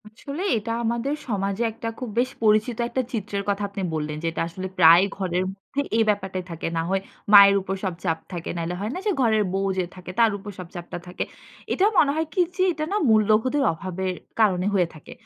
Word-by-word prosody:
আসলে 280 Hz, +9 st, -7 dB, 0.2 s
এটা 220 Hz, +2 st, -4 dB
আমাদের 235 Hz, +4 st, -1 dB
সমাজে 200 Hz, -1 st, -1 dB
একটা 225 Hz, +1 st, -7 dB
খুব 250 Hz, -, -4 dB
বেশ 255 Hz, +1 st, +2 dB
পরিচিত 215 Hz, +2 st, +3 dB
একটা 260 Hz, -, -1 dB
চিত্রের 205 Hz, -2 st, -3 dB
কথা 200 Hz, 0 st, 0 dB
আপনি 200 Hz, 0 st, -5 dB
বললেন 150 Hz, -1 st, -3 dB
যেটা 165 Hz, 0 st, -1 dB
আসলে 185 Hz, +3 st, -6 dB
প্রায় 170 Hz, +1 st, +8 dB
ঘরের 185 Hz, -2 st, -1 dB
মধ্যে 200 Hz, +8 st, -4 dB, 0.2 s
এই 225 Hz, -, +5 dB
ব্যাপারটাই 190 Hz, -3 st, -1 dB
থাকে। 165 Hz, 0 st, -4 dB
না -, -, +2 dB
হয় 195 Hz, 0 st, +1 dB, 0.3 s
মায়ের 200 Hz, -1 st, +10 dB
উপর 190 Hz, +1 st, -3 dB
সব 190 Hz, -2 st, -1 dB
চাপ 165 Hz, -2 st, +1 dB
থাকে, 175 Hz, -2 st, -5 dB
নাইলে 170 Hz, +1 st, -2 dB
হয় 205 Hz, +2 st, -2 dB
না -, -, -4 dB
যে, 420 Hz, -, +2 dB
ঘরের 220 Hz, -3 st, +3 dB
বউ 195 Hz, 0 st, 0 dB
যে 185 Hz, -, +2 dB
থাকে, 180 Hz, 0 st, -8 dB
তার 230 Hz, -1 st, +5 dB
উপর 205 Hz, +1 st, -8 dB
সব 180 Hz, -, -7 dB
চাপটা 175 Hz, 0 st, -6 dB
থাকে। 180 Hz, -, -3 dB, 0.5 s
এটা 380 Hz, -, +3 dB
মনে 280 Hz, -, +5 dB
হয় 320 Hz, +1 st, 0 dB
কি -, -, -2 dB, 0.2 s
যে, 370 Hz, -, -1 dB
এটা 310 Hz, -, -4 dB
না 410 Hz, -, +1 dB
মূল্যবোধের 220 Hz, +6 st, +3 dB
অভাবের 185 Hz, +2 st, -3 dB, 0.3 s
কারণে 190 Hz, -4 st, +3 dB
হয়ে 180 Hz, -3 st, +3 dB
থাকে। 155 Hz, -, -13 dB
200 Hz, 210 wpm, -24 LUFS, 185-225 Hz, 0.5 s, মায়ের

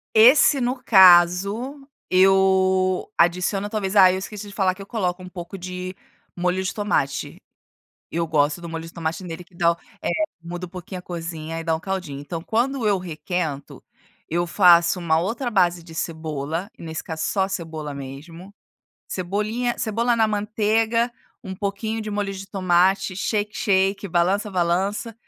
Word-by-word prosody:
Esse 265 Hz, +5 st, +7 dB
no 250 Hz, +1 st, -1 dB
caso 200 Hz, +8 st, +5 dB, 0.2 s
eu 190 Hz, 0 st, +3 dB
adiciono 180 Hz, +4 st, +1 dB
talvez 205 Hz, -2 st, -2 dB
ah, 185 Hz, -2 st, +8 dB
eu 185 Hz, -, -1 dB
esqueci 205 Hz, +1 st, -7 dB
de 200 Hz, -, -11 dB
falar 190 Hz, -3 st, +2 dB
que 195 Hz, -, -12 dB
eu -, -, -8 dB
coloco 185 Hz, -5 st, -2 dB
um 180 Hz, -, -9 dB
pouco 175 Hz, +1 st, -8 dB
de 185 Hz, 0 st, -6 dB, 0.4 s
molho 180 Hz, +1 st, 0 dB
de 185 Hz, -, -2 dB
tomate, 140 Hz, -, -1 dB, 0.7 s
eu 170 Hz, +1 st, -1 dB
gosto 150 Hz, 0 st, +1 dB
do 170 Hz, -, -7 dB
molho 165 Hz, 0 st, -5 dB
de 165 Hz, -, -12 dB
tomate 165 Hz, +1 st, -3 dB
nele 170 Hz, 0 st, -7 dB
que 175 Hz, -, -29 dB
dá 170 Hz, -1 st, +2 dB
o -, -, -16 dB, 0.2 s
eh, -, -, -2 dB, 0.3 s
muda 175 Hz, +2 st, -6 dB
um -, -, -14 dB
pouquinho 185 Hz, 0 st, -8 dB
a -, -, -10 dB
cozinha 165 Hz, -2 st, -6 dB
e -, -, -6 dB
dá 165 Hz, -1 st, +1 dB
um 160 Hz, -, -5 dB
caldinho, 180 Hz, -7 st, -4 dB
então 165 Hz, +3 st, -6 dB
quando 235 Hz, +5 st, 0 dB
eu 200 Hz, -, +3 dB
requento, 160 Hz, -4 st, -4 dB, 0.5 s
eu 175 Hz, +2 st, 0 dB
faço 175 Hz, -1 st, +5 dB
uma 160 Hz, -2 st, +2 dB
outra 235 Hz, +8 st, -2 dB
base 175 Hz, -4 st, +2 dB
de 165 Hz, -1 st, -13 dB
cebola, 160 Hz, +2 st, -4 dB
e -, -, -11 dB
nesse 160 Hz, 0 st, -5 dB
caso 160 Hz, -1 st, -5 dB
só 190 Hz, -2 st, +1 dB
cebola 160 Hz, -5 st, -5 dB
mesmo, 150 Hz, +8 st, -9 dB, 0.5 s
cebolinha 210 Hz, +6 st, -2 dB
cebola 235 Hz, +2 st, 0 dB
na 225 Hz, -1 st, +4 dB
manteiga, 220 Hz, +3 st, +1 dB, 0.3 s
um 190 Hz, -1 st, -5 dB
pouquinho 205 Hz, +3 st, -3 dB
de 215 Hz, -1 st, -5 dB
molho 205 Hz, -1 st, -2 dB
de 195 Hz, 0 st, -8 dB
tomate, 190 Hz, 0 st, +2 dB
"shake, 210 Hz, +2 st, -2 dB
shake", 195 Hz, -1 st, +1 dB
balança, 185 Hz, +5 st, +1 dB
balança, 190 Hz, +5 st, -1 dB
185 Hz, 170 wpm, -23 LUFS, 170-205 Hz, 0.7 s, ah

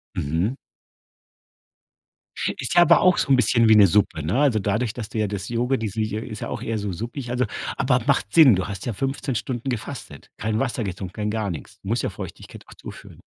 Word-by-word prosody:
Mhm. 85 Hz, -, -1 dB, 2.1 s
Ist -, -, -3 dB
ja 175 Hz, -, +8 dB
aber 175 Hz, -, +6 dB
auch 185 Hz, -1 st, +4 dB
so -, -, 0 dB
'n 135 Hz, -, +6 dB
bisschen 115 Hz, -2 st, +3 dB
wie 110 Hz, -, +7 dB
'ne 100 Hz, -2 st, +8 dB
Suppe, 90 Hz, -4 st, +1 dB
ne, 85 Hz, -, -1 dB
also, 135 Hz, -6 st, +3 dB
dadurch, 105 Hz, +3 st, -1 dB
dass 115 Hz, -3 st, -6 dB
du -, -, -6 dB
ja 110 Hz, -1 st, +1 dB
das 100 Hz, 0 st, -5 dB
Jogu 120 Hz, +3 st, 0 dB
die 110 Hz, -, -3 dB
s 95 Hz, -, -8 dB
ist 110 Hz, 0 st, -3 dB
auch -, -, -4 dB
eher 115 Hz, 0 st, -2 dB
so 100 Hz, -1 st, -3 dB
suppig, 120 Hz, -, -6 dB
also, 125 Hz, +1 st, +1 dB, 0.3 s
aber 125 Hz, -1 st, +2 dB
macht 100 Hz, +1 st, +1 dB
Sinn. 145 Hz, -9 st, +8 dB
Du 95 Hz, 0 st, -2 dB
hast 100 Hz, -2 st, -6 dB
ja 120 Hz, -, -1 dB
15 135 Hz, +3 st, -3 dB
Stunden 120 Hz, +3 st, -3 dB
gefastet, 120 Hz, -, -6 dB
kein 110 Hz, +1 st, -1 dB
Wasser 125 Hz, -2 st, -1 dB
getrunken, 95 Hz, -2 st, -5 dB
kein 105 Hz, 0 st, -3 dB
gar 110 Hz, -2 st, -2 dB
nichts 75 Hz, -7 st, -9 dB
du -, -, -12 dB
musst -, -, 0 dB
ja -, -, 0 dB
Feuchtigkeit -, -, -9 dB
auch -, -, -13 dB
zuführen. -, -, -12 dB
110 Hz, 215 wpm, -23 LUFS, 100-125 Hz, 2.1 s, ja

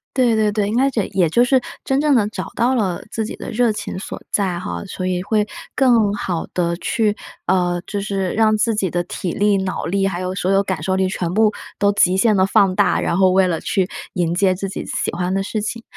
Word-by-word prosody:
对 245 Hz, -4 st, +3 dB
对 215 Hz, -1 st, +2 dB
对， 205 Hz, -1 st, 0 dB
那 255 Hz, +5 st, +3 dB
这 215 Hz, -7 st, -1 dB
也 180 Hz, -3 st, +4 dB
就 235 Hz, +10 st, +3 dB
是 260 Hz, +1 st, +3 dB, 0.2 s
真 270 Hz, +1 st, +1 dB
正 295 Hz, -1 st, +3 dB
地 215 Hz, -4 st, +3 dB
找 215 Hz, -, -5 dB
到 245 Hz, +3 st, +2 dB
了 195 Hz, -7 st, -1 dB
自 220 Hz, -, -2 dB
己 -, -, -6 dB
的 -, -, -8 dB
热 240 Hz, 0 st, +2 dB
情 210 Hz, -, -5 dB
所 190 Hz, -, -7 dB
在 185 Hz, -4 st, 0 dB
哈， 185 Hz, -, -5 dB
所 185 Hz, -1 st, -4 dB
以 180 Hz, -1 st, -1 dB
会 210 Hz, +1 st, +1 dB, 0.3 s
更 235 Hz, -6 st, +3 dB
好 180 Hz, -4 st, -3 dB
地 170 Hz, -1 st, 0 dB
去 210 Hz, +4 st, 0 dB, 0.3 s
啊， 175 Hz, -1 st, +1 dB
就 205 Hz, -, -3 dB
是 195 Hz, -2 st, -2 dB
让 215 Hz, 0 st, +3 dB
自 215 Hz, +1 st, +1 dB
己 190 Hz, -5 st, -1 dB
的 175 Hz, 0 st, 0 dB
体 180 Hz, 0 st, -4 dB
力、 205 Hz, 0 st, +2 dB
脑 185 Hz, -, -3 dB
力， 195 Hz, +2 st, +1 dB
还 180 Hz, -2 st, -3 dB
有 185 Hz, 0 st, -3 dB
所 190 Hz, 0 st, 0 dB
有 195 Hz, 0 st, +4 dB
感 185 Hz, -5 st, -3 dB
受 185 Hz, +2 st, 0 dB
力 190 Hz, 0 st, +1 dB
全 175 Hz, -2 st, -3 dB
部 215 Hz, +1 st, +4 dB, 0.3 s
都 200 Hz, 0 st, +3 dB
极 185 Hz, -2 st, +3 dB
限 210 Hz, +1 st, +3 dB
地 185 Hz, -, +4 dB
放 195 Hz, -1 st, +3 dB
大， -, -, +2 dB
然 170 Hz, -, 0 dB
后 190 Hz, -1 st, +4 dB
为 190 Hz, 0 st, +4 dB
了 165 Hz, -3 st, -1 dB
去 190 Hz, -1 st, -1 dB, 0.2 s
迎 175 Hz, -3 st, 0 dB
接 185 Hz, 0 st, +3 dB
自 195 Hz, +1 st, -4 dB
己 -, -, -6 dB
喜 -, -, -2 dB
欢 180 Hz, +1 st, -2 dB
的 195 Hz, -, +1 dB
事 210 Hz, +2 st, -3 dB
情。 230 Hz, +2 st, -4 dB
195 Hz, 260 characters per minute, -20 LUFS, 185-215 Hz, 0.3 s, 也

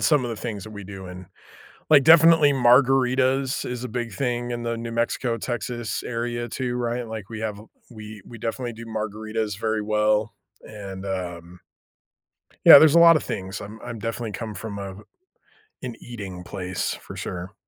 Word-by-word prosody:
some 150 Hz, -5 st, +3 dB
of 120 Hz, -, -3 dB
the 115 Hz, -, -4 dB
things 105 Hz, -4 st, -5 dB
that 110 Hz, -, -10 dB
we 105 Hz, -1 st, -8 dB
do. 95 Hz, -1 st, -9 dB
And, 90 Hz, 0 st, -9 dB, 0.6 s
like, 145 Hz, -3 st, +7 dB
definitely 160 Hz, -2 st, +7 dB
margaritas 130 Hz, +1 st, +3 dB
is 125 Hz, 0 st, -5 dB
a 125 Hz, -, -5 dB
big 120 Hz, -1 st, -4 dB
thing 120 Hz, +1 st, -2 dB
in 120 Hz, 0 st, -3 dB
the 115 Hz, 0 st, -2 dB
New 115 Hz, 0 st, -5 dB
Mexico, 115 Hz, +1 st, -1 dB
Texas 120 Hz, -1 st, -4 dB
area 120 Hz, 0 st, -3 dB
too, 125 Hz, -2 st, -3 dB
right, 120 Hz, 0 st, -2 dB
like, 110 Hz, -3 st, -7 dB
we 110 Hz, -, -6 dB
have 105 Hz, -2 st, -3 dB, 0.3 s
we 110 Hz, -2 st, -10 dB
we 115 Hz, -, -11 dB
definitely 120 Hz, +2 st, -3 dB
do 115 Hz, +1 st, -10 dB
margaritas 110 Hz, -1 st, -4 dB
very 110 Hz, -1 st, -1 dB
well. 105 Hz, 0 st, +1 dB, 0.3 s
And, 100 Hz, -3 st, -8 dB
um 90 Hz, -2 st, -5 dB, 1.1 s
Yeah, -, -, +12 dB
there's 155 Hz, 0 st, +6 dB
a -, -, +7 dB
lotta 165 Hz, -2 st, +7 dB
things. 95 Hz, 0 st, -5 dB
I'm 105 Hz, +2 st, -9 dB
I'm 115 Hz, -, -6 dB
definitely 115 Hz, 0 st, -4 dB
come 110 Hz, +2 st, -6 dB
from 100 Hz, +1 st, -6 dB
a 100 Hz, -1 st, -6 dB, 0.9 s
an 125 Hz, -3 st, -5 dB
eating 100 Hz, -7 st, -8 dB
place 90 Hz, -1 st, -3 dB
for -, -, -11 dB
sure. 90 Hz, +3 st, -6 dB
115 Hz, 175 wpm, -24 LUFS, 105-125 Hz, 1.1 s, Yeah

